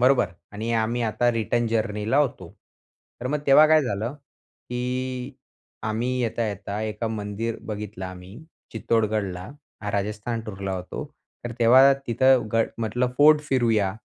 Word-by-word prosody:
बरोबर? 130 Hz, -2 st, +4 dB, 0.3 s
आणि 110 Hz, +3 st, -4 dB
आम्ही 115 Hz, +2 st, -1 dB
आता 120 Hz, +2 st, +1 dB
रिटर्न 115 Hz, +1 st, 0 dB
जर्नीला 110 Hz, +1 st, 0 dB
होतो. 115 Hz, -, 0 dB, 0.7 s
तर 125 Hz, -, -3 dB
मग 150 Hz, +3 st, 0 dB
तेव्हा 145 Hz, +3 st, +8 dB
काय 155 Hz, 0 st, +5 dB
झालं 115 Hz, +1 st, -3 dB
की 125 Hz, -2 st, -6 dB, 0.5 s
आम्ही 110 Hz, +3 st, -1 dB
येता-येता 105 Hz, -3 st, -3 dB
एका 110 Hz, +1 st, -3 dB
मंदिर 110 Hz, +1 st, -3 dB
बघितलं 105 Hz, -3 st, -5 dB
आम्ही, 95 Hz, +3 st, -10 dB, 0.3 s
चित्तोडगडला. 105 Hz, -5 st, -1 dB, 0.4 s
राजस्थान 105 Hz, +3 st, -2 dB
टूरला 95 Hz, -2 st, -4 dB
होतो 90 Hz, 0 st, -6 dB, 0.4 s
तर 120 Hz, -, -4 dB
तेव्हा 130 Hz, +4 st, +7 dB
तिथं 130 Hz, +1 st, +3 dB
गड 115 Hz, 0 st, +2 dB
म्हटलं 115 Hz, +3 st, 0 dB
फोर्ड 150 Hz, +1 st, +7 dB
फिरूया. 110 Hz, -7 st, +2 dB
115 Hz, 130 wpm, -24 LUFS, 105-125 Hz, 0.7 s, तेव्हा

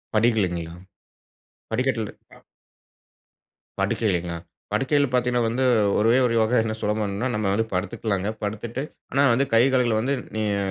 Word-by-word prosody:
படிகள்லைங்களா? 95 Hz, -7 st, +1 dB, 1.0 s
படிக்கட்ல 125 Hz, 0 st, 0 dB, 0.3 s
அ. -, -, -20 dB, 1.4 s
படுக்கைங்ளா, 90 Hz, -6 st, 0 dB, 0.3 s
படுக்கைகள் 140 Hz, 0 st, +1 dB
பாத்தீங்கன்னா, 125 Hz, -1 st, +2 dB
வந்து 125 Hz, +3 st, -1 dB, 0.4 s
ஒரே 115 Hz, +4 st, +4 dB
ஒரு 120 Hz, -, +1 dB
யோகா 110 Hz, +3 st, +2 dB
என்ன 110 Hz, -1 st, -2 dB
சுலபம்னா 105 Hz, +2 st, -1 dB
நம்ம 105 Hz, -, -1 dB
வந்து 110 Hz, +2 st, +1 dB
படுத்துக்கலாங்க. 100 Hz, 0 st, -2 dB, 0.2 s
படுத்துட்டு, 110 Hz, +5 st, -4 dB, 0.3 s
ஆனா 140 Hz, -, +2 dB
வந்து 135 Hz, +4 st, +2 dB
கை 115 Hz, -, +6 dB
கால்கள் 120 Hz, -4 st, +2 dB
வந்து, 130 Hz, +5 st, 0 dB, 0.2 s
நீங்க 105 Hz, -2 st, 0 dB
110 Hz, 125 wpm, -24 LUFS, 105-125 Hz, 1.4 s, கை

